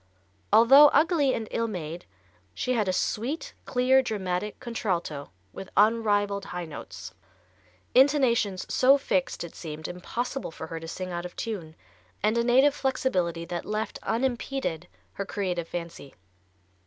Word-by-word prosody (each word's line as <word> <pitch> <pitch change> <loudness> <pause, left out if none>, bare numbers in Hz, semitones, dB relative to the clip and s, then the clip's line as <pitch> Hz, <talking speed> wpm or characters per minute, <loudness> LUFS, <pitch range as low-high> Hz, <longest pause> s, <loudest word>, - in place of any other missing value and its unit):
Although 250 +7 +8
ugly 295 -2 +3
and 220 - -4
ill 230 0 0
made, 170 -5 -6 0.5
she 255 - -1
had 215 -5 +1
a - - +2
sweet, 275 - -2
clear 255 +1 +4
dramatic 205 -4 -3
contralto 180 - -3 0.2
with 190 - -8
unrivalled 205 -2 +2
high 180 -2 -5
notes, 155 - -9 0.8
intonations 250 -8 +3
so 270 +2 +5
fixed 270 -5 -1
it 170 - -8
seemed 155 -1 -6
impossible 240 +9 -4
for 160 - -8
her 165 0 -6
to 165 - -9
sing 185 +2 -5
out 175 0 -3
of 175 - -18
tune, 180 -9 -5 0.5
and 215 +2 +3
a 235 - +2
native 260 +4 +5
flexibility 180 - -1
that 175 0 -4
left 215 +1 -3
unimpeded 240 - -2 0.3
her 200 - -3
creative 180 -4 -2
fancy. 170 -5 -7
210 Hz, 140 wpm, -27 LUFS, 175-255 Hz, 0.8 s, Although